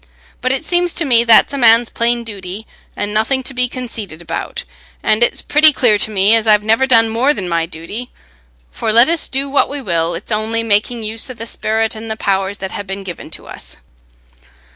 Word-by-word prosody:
But 255 - 0
it 265 +3 -1
seems 350 0 0
to 335 - +2
me 235 -4 +4
that's 230 +4 +5
a 280 - -3
man's 230 -1 +4
plain 235 0 0
duty, 205 -1 -8 0.3
and 205 0 -4
nothing 245 +5 0
to 270 - -3
be 250 -1 0
conceited 225 -10 -6
about, 170 - -5 0.4
and 215 +1 +2
it's 240 - +1
pretty 305 +1 +5
clear 235 -7 +2
to - - +1
me 205 0 +3
as 225 -1 +2
I've 210 -1 +4
never 225 +5 +2
done 230 -3 +4
more 245 +7 +1
than 185 - -4
my 165 -1 -1
duty; 180 +9 -7 0.6
for 215 - -2
let 235 +6 +5
us 335 -1 0
do 270 +1 -2
what 280 0 +1
we 285 - -4
will, 170 -7 -2
it's 185 +7 -9
only 220 +2 -1
making 225 +2 0
use 220 +3 -1
o' 255 - -7
the 230 0 -7
sperrit 220 -1 -1
and 220 0 -8
the 220 - -4
powers 195 0 -1
that 190 -1 -6
ha' - - -4
been 195 0 -6
given 175 -4 -8
to - - -7
us. - - -10
225 Hz, 215 wpm, -16 LUFS, 205-250 Hz, 0.6 s, that's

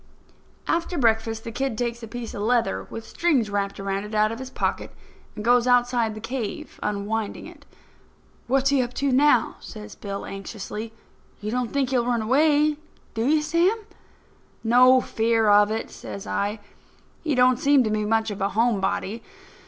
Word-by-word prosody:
After 340 +1 -1
breakfast 225 -3 +1
the 230 - -6
kid 265 -1 -2
takes 235 -1 -2
a 225 - -7
piece 240 0 -6
of 205 - -5
leather 235 +2 0
with 225 0 -7
strings 270 -12 +1
wrapped 200 -1 -2
around 195 0 -2
it 210 +1 -7
out 215 0 +3
of 230 - -6
his 260 0 -7
pocket - - -2 0.5
and 210 0 -6
goes 245 +1 +4
outside 245 -3 +2
the - - -7
cave 225 -1 -5
unwinding 210 +1 -3
it. - - -14 0.8
"What's 270 +2 +2
he 275 -2 +3
up 245 0 -4
to 280 +1 0
now?" 260 -2 +3
says 210 -1 -10
Bill, 200 -1 -6
anxiously. 210 +2 -6 0.5
"You 210 +1 -4
don't 250 -1 -1
think 270 -2 0
he'll 245 -2 +1
run 235 -2 +1
away, 295 +4 +3 0.4
do 225 +2 -1
you, 305 +1 +3
Sam?" 340 +7 +2 0.9
"No 250 +3 +6
fear 225 -1 +1
of 205 0 +6
it," 220 +1 -3
says 200 +1 -8
I. 205 +1 -2 0.6
"He 305 -4 0
don't 250 0 +4
seem 280 -1 +4
to 215 - -1
be 215 0 0
much 220 +1 +1
of 200 - -6
a 195 - +1
home 225 -1 +1
body. 210 +3 -2
230 Hz, 175 wpm, -24 LUFS, 215-255 Hz, 0.9 s, No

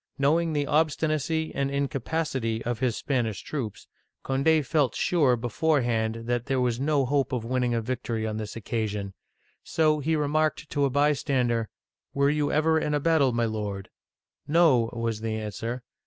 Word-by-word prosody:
Knowing 160 +4 +2
the 145 -1 0
obstinacy 155 +1 0
and 140 0 -1
incapacity 135 -4 -2
of 120 -1 -2
his 125 -3 0
Spanish 115 - -1
troops, 125 -9 -5 0.4
Cond6 145 +3 +2
felt 145 -2 +1
sure 145 -8 +3
beforehand 115 -3 0
that 120 0 -1
there 135 -1 +1
was 125 -1 0
no 140 -1 +2
hope 135 0 0
of 125 -4 -2
winning 125 -1 0
a 115 - 0
victory 120 -2 -3
on 110 -1 -3
this 110 -1 -5
occasion; 105 -3 -3 0.5
so 155 -1 +1
he 160 +3 0
re 150 -1 0
marked 155 0 0
to 145 -1 +2
a - - +1
bystander, 135 -5 +1 0.5
"Were 140 +1 +3
you 150 -1 0
ever 160 +1 +3
in 150 -1 -1
a - - +1
battle, 145 -4 +3
my 120 0 +1
lord.?" 105 -3 -4 0.3
" - - -51
No," 130 -10 +5
was 115 -2 -3
the 110 -1 -2
answer. 110 +3 -4
130 Hz, 170 wpm, -26 LUFS, 115-150 Hz, 0.5 s, No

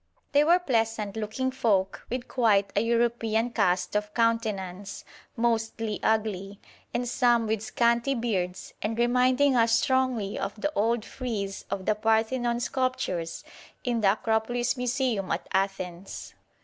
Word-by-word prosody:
They 285 +1 +5
were 340 +3 +5
pleasant 225 - -1
looking 220 +5 -2
folk 200 -7 0
with 250 +1 -3
quite 210 -5 +2
a 205 - +3
European 230 0 +1
cast 180 -4 +1
of 210 0 -1
countenance, 205 -5 -1 0.3
mostly 225 -2 -1
ugly, 205 -3 -1 0.3
and 245 0 -2
some 240 -2 +3
with 220 -1 -1
scanty 235 +4 +1
beards, 190 -7 -2
and 220 +2 -2
reminding 255 +3 +3
us 230 -1 +4
strongly 255 -6 0
of 205 - -4
the 300 +7 -1
old 225 +2 +1
frieze 210 -6 -4
of 190 - -3
the 215 - +3
Parthenon 225 +3 +1
sculptures 240 -11 -2 0.4
in 240 -3 0
the 195 -1 +5
Acropolis 225 +3 0
Museum 250 -5 -1
at - - -2
Athens. 190 -1 -3
225 Hz, 135 wpm, -27 LUFS, 205-245 Hz, 0.4 s, They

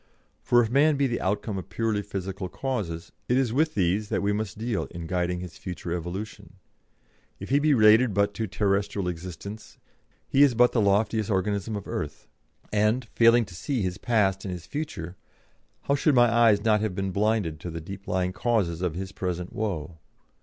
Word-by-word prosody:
For 120 0 +4
if 110 - -3
man 145 +3 +4
be 140 - +2
the 120 -3 -1
outcome 100 +1 -1
of 95 - -10
purely 110 +2 -1
physical 95 -1 -5
causes, 100 -11 -4 0.2
it 125 - +3
is 130 -4 +1
with 155 +4 +1
these 100 +3 +1
that - - -1
we 100 +1 +1
must 105 -2 -3
deal 115 -1 -2
in 85 -1 -8
guiding 90 0 -1
his 90 -3 -9
future 90 -2 -5
evolution. 90 +5 -6 0.9
If - - -7
he 140 +2 +4
be 150 -1 +3
related 110 +1 +6
but 100 +1 +1
to 110 +1 -3
terrestrial 100 -1 0
existence, 90 +5 -7 0.5
he 135 - +3
is 140 -4 +6
but 125 +1 +5
the 115 - +2
loftiest 105 +2 +2
organism 100 +1 -1
of 100 - -6
earth; 75 -1 -5 0.5
and, 105 +4 +2
failing 115 0 +5
to 95 - -13
see 125 - -2
his 90 +1 -3
past 100 -5 +1
and 95 - -4
his 90 -2 -7
future, 95 - -5 0.6
how 140 - 0
should 145 0 +2
my 120 -1 +5
eyes 115 -3 +4
not 105 -2 +3
have 110 -4 -2
been 95 0 -2
then - - -6
blinded 105 -8 +1
to 85 - -6
the 85 0 -5
deep 95 +4 -9
lying 90 0 0
causes 95 -7 0
of 90 -3 -1
his 95 +1 -5
present 90 -1 -4
woe? 85 -6 -4
100 Hz, 195 wpm, -26 LUFS, 90-115 Hz, 0.9 s, related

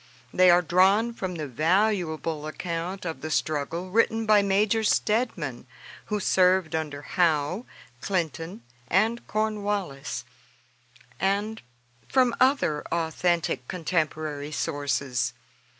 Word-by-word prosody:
They 185 0 +6
are 175 +1 +6
drawn 195 +7 +3
from 185 -5 -4
the 155 -2 -4
valuable 160 - 0
account 170 +4 -4
of 165 -2 -4
the 155 - -4
struggle 155 +4 -2
written 225 +1 +2
by 215 -1 +5
Major 200 +3 +2
Steadman, 210 - 0 0.4
who 210 - -2
served 185 -3 +3
under 150 -3 -3
Howe, 170 - 0 0.3
Clinton, 165 -5 -3 0.2
and 220 - +1
Cornwallis, 205 -9 -2 0.9
and 200 +4 0 0.5
from 255 -3 +3
other 255 - +3
authentic 165 -4 0
contemporary 155 -4 -2
sources. 140 -4 -1
180 Hz, 105 wpm, -26 LUFS, 155-205 Hz, 0.9 s, They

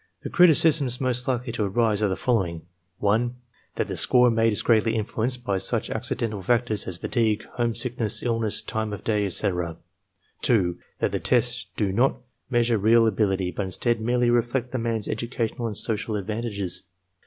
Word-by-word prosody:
The - - -5
criticisms 155 -7 +4
most 125 -2 0
likely 125 -1 -1
to 115 -2 -1
arise 105 +1 +1
are 105 - +3
the 95 - -1
following: 95 -10 -1 0.3
(1) 115 +5 +1 0.4
That - - -1
the - - -4
score 125 -1 +4
made 115 0 +2
is 105 - -1
greatly 115 -1 +3
influenced 115 +3 -1
by 100 -5 0
such - - -1
accidental 105 -4 -2
factors 115 +1 0
as 90 - -4
fatigue, 110 -1 0
homesickness, 120 -2 -1
illness, 115 -3 0
time 110 -1 -3
of 100 - -7
day, 105 -2 +1
etc. 90 -3 -1 0.6
(2) 90 -8 +2 0.2
That - - 0
the - - -1
tests - - +1
do 100 -2 0
not 120 +7 +2 0.3
measure 120 -3 +2
real 115 +3 +5
ability, 95 -4 +1
but 100 +4 -3
instead 115 +4 -1
merely 120 +1 +2
reflect 120 +1 0
the 130 - -2
man's 115 -2 -2
educational 115 0 -3
and 105 - -4
social 110 -1 -2
advantages. 105 -2 -3
115 Hz, 165 wpm, -25 LUFS, 105-120 Hz, 0.6 s, real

